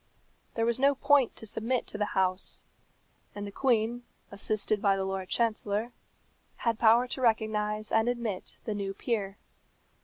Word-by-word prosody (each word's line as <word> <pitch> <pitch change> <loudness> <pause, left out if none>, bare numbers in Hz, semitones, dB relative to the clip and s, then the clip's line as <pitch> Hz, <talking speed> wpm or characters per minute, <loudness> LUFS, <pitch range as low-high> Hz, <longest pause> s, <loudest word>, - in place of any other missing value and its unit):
There 230 - +1
was 235 +1 0
no 280 +1 +4
point 280 -2 +3
to - - -8
submit 230 +4 -1
to - - -6
the 210 - -2
House, 185 0 0 0.7
and 205 0 -5
the 200 - -6
Queen, 235 0 +1 0.3
assisted 205 +1 -1
by 200 -1 +4
the 190 - -1
Lord 190 -1 -3
Chancellor, 220 0 0 0.6
had 230 -2 -1
power 235 +2 +5
to 260 - -4
recognize 215 -2 0
and 225 +2 +3
admit 235 -6 -4
the 215 - -2
new 195 -1 -3
peer. 205 -4 -2
220 Hz, 155 wpm, -29 LUFS, 205-235 Hz, 0.7 s, power